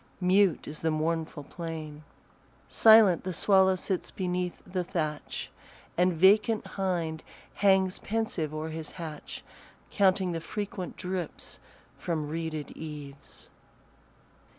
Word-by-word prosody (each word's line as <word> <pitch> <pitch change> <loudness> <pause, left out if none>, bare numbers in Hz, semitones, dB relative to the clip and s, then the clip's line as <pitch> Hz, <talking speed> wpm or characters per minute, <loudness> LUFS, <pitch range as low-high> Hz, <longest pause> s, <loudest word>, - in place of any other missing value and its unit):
Mute 185 -1 +3
is 150 - -6
the 160 - 0
mournful 160 -1 -2
plain; 155 -1 -7 0.6
Silent 220 -5 +6
the 185 - -3
swallow 190 +1 +4
sits 185 0 -2
beneath 180 -1 -3
the 180 0 -2
thatch, 155 -4 -4 0.4
And 180 +1 +3
vacant 210 +6 +4
hind 170 -5 -2 0.3
hangs 190 -2 +3
pensive 220 - -2
o'er 155 +1 -4
his 160 -1 -5
hatch, 155 -4 -7 0.5
Counting 190 -2 +3
the 165 -1 -3
frequent 205 0 -5
drips 180 -3 -5 0.4
from 155 -4 -2
reeded 160 -2 -4
eaves. 145 -3 -9
175 Hz, 110 wpm, -29 LUFS, 155-190 Hz, 0.6 s, Silent